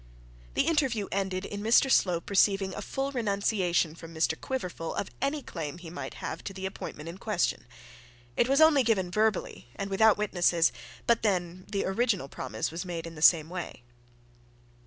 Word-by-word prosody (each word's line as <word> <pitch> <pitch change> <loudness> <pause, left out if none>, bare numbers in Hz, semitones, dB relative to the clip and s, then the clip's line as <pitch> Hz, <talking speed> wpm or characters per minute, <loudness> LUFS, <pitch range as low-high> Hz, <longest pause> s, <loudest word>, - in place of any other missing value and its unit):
The - - +3
interview 265 -11 +1
ended 190 -1 -1
in 205 0 -5
Mr 235 +5 +4
Slope 175 -4 +2
receiving 195 -1 +3
a - - -5
full 270 +1 -3
renunciation 200 - +1
from 165 0 -11
Mr 160 0 +2
Quiverful 180 -5 -4
of 200 - -3
any 280 +2 -1
claim 160 -2 -5
he 170 -2 -10
might 175 - -6
have - - -6
to 195 - -5
the 190 0 -6
appointment 165 -5 -6
in 170 +3 -8
question. 210 -5 -1 0.7
It 240 - +2
was 275 +3 +4
only 315 -3 +7
given 205 -7 +1
verbally 215 - 0
and 200 0 -4
without 215 +2 +5
witnesses; 175 -5 +2 0.3
but 235 -1 +3
then 185 -3 -1
the 200 -2 -1
original 195 - 0
promise 115 -3 -4
was 165 +2 -4
made 170 -3 -5
in 165 - -8
the 155 - -10
same 160 -1 +6
way. 175 -7 -6
190 Hz, 175 wpm, -29 LUFS, 170-220 Hz, 0.7 s, only